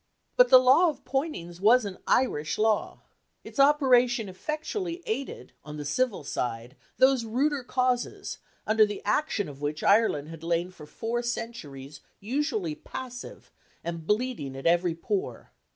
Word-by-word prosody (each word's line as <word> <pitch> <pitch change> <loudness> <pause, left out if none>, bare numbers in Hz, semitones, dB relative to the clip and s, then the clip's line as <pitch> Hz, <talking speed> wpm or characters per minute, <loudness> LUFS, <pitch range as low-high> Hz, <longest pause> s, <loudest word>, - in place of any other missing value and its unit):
But - - +6
the - - +10
Law 260 +8 +5
of 305 - -8
Poynings 190 - -3
was 230 +3 +5
an 195 -2 -6
Irish 155 - +1
Law. 215 -1 0 0.4
Its - - -9
operation 250 -5 +4
effectually 335 - -4
aided 260 +5 -5
on 150 0 -8
the 145 - -6
civil 225 - 0
side 120 -2 -4 0.2
those 260 -2 +4
ruder 265 +5 0
causes, 250 0 -1 0.3
under 215 0 +4
the 210 -1 -2
action 210 -1 0
of 140 -1 -11
which 150 +1 -3
Ireland 200 -9 +3
had 165 -1 -10
lain 170 +2 -1
for 155 -5 -13
four 235 +7 -3
centuries 200 - -6 0.2
usually 225 - -2
passive, 250 +9 -9 0.3
and 165 -1 -5
bleeding 210 - -1
at 135 - -8
every 170 0 +2
pore. 395 - -4
220 Hz, 145 wpm, -27 LUFS, 165-260 Hz, 0.4 s, the